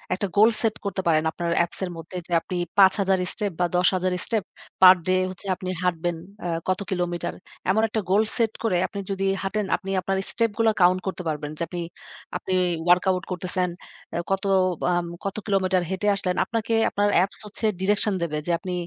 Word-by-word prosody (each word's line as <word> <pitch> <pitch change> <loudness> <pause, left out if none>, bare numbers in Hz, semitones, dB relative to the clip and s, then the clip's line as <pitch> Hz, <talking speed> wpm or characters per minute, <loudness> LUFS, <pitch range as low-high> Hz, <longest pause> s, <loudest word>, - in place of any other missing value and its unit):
একটা 200 - -2
goal 215 +2 +7
set 225 -2 +1
করতে 195 -1 -2
পারেন 155 -1 +3
আপনার 170 +1 -3
Apps - - -12
এর 180 - -3
মধ্যে। 165 +3 -8
যে - - -15
আপনি 180 - -5 0.2
৫ 190 -1 +7
হাজার 190 -1 +2
step 205 -2 -2
বা 175 - +3
১০ 180 +1 +4
হাজার 185 0 0
step 220 -4 0 0.4
পার-ডে 185 0 +7
হচ্ছে 190 +1 -9
আপনি 185 +1 -6
হাঁটবেন 175 -1 0 0.3
অ্যা 175 - -3 0.2
কত 185 +1 +1
কিলোমিটার। 175 -2 -2 0.4
এমন 220 +3 +2
একটা 220 0 -2
goal 205 +3 +4
set 225 -2 +2
করে 220 -6 +2
আপনি 200 - -7
যদি 195 0 -1 0.2
হাঁটেন 205 +1 -1
আপনি 195 -2 -7
আপনার 195 +1 -1
step 230 -2 +1
গুলা 225 -1 +4
count 180 +1 +5
করতে 185 -1 -3
পারবেন 150 -1 -3
যে - - -5
আপনি 175 -1 -5 0.6
আপনি 190 - -4 0.4
workout 180 +1 +3
করতেছেন, 180 0 -1 0.4
অ্যা 170 - -1
কত 195 - 0 0.5
আম 175 0 0 0.2
কত 195 - -2
কিলোমিটার 190 -3 +2
হেঁটে 190 +2 -2
আসলেন? 180 -2 0
আপনাকে 230 -1 -2 0.2
আপনার 205 0 +1
অ্যাপস 185 +3 +1
হচ্ছে 215 +2 -4 0.2
direction 205 +1 +2
দেবে 155 -2 -2
যে 175 - +1
আপনি 185 -2 -5
185 Hz, 190 wpm, -24 LUFS, 180-200 Hz, 0.6 s, goal